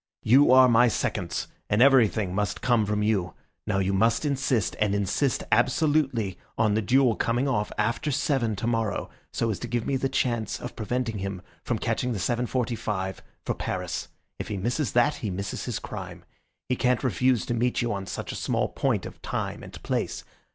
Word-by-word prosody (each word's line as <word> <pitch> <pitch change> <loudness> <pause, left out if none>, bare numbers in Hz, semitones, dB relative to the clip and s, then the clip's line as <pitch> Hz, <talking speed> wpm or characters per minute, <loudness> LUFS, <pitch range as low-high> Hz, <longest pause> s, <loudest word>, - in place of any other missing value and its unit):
You 130 +5 +6
are 130 0 +8
my 120 0 +5
seconds, 95 -5 -2 0.2
and 105 - +2
everything 110 -8 +4
must 105 +1 -1
come 120 -5 +2
from 105 0 0
you. 100 -5 0 0.3
Now 105 -3 +1
you 95 0 +1
must 115 +7 +2
insist, 130 - 0
and 105 -1 +2
insist 100 +7 0
absolutely, 125 - +2 0.2
on 110 -2 +3
the 110 - +2
duel 125 +2 +3
coming 120 +4 0
off 105 -6 0
after 115 +7 0
seven 135 -5 0
tomorrow, 115 -1 -1 0.2
so 115 - 0
as 100 - -4
to 120 - -5
give 120 -1 -2
me 135 - 0
the 135 +1 -1
chance 120 -5 -1
of 125 - -7
preventing 115 -1 -2
him 95 -1 -4 0.2
from - - -1
catching 125 -1 -1
the - - -3
7.45 115 -3 -1 0.3
for - - 0
Paris. - - -3 0.3
If - - -4
he 105 - -3
misses 120 +8 -1
that 125 +5 +3
he 110 - -3
misses 95 +1 -4
his - - -2
crime. - - -8 0.4
He 125 - +1
can't 125 +1 +1
refuse 125 -1 +2
to 120 - -2
meet 120 +1 +1
you 120 - 0
on 100 -1 -5
such 90 - -5
a - - -6
small - - 0
point - - 0
of - - -10
time - - -3
and - - -10
place. - - -2
115 Hz, 185 wpm, -26 LUFS, 105-125 Hz, 0.4 s, are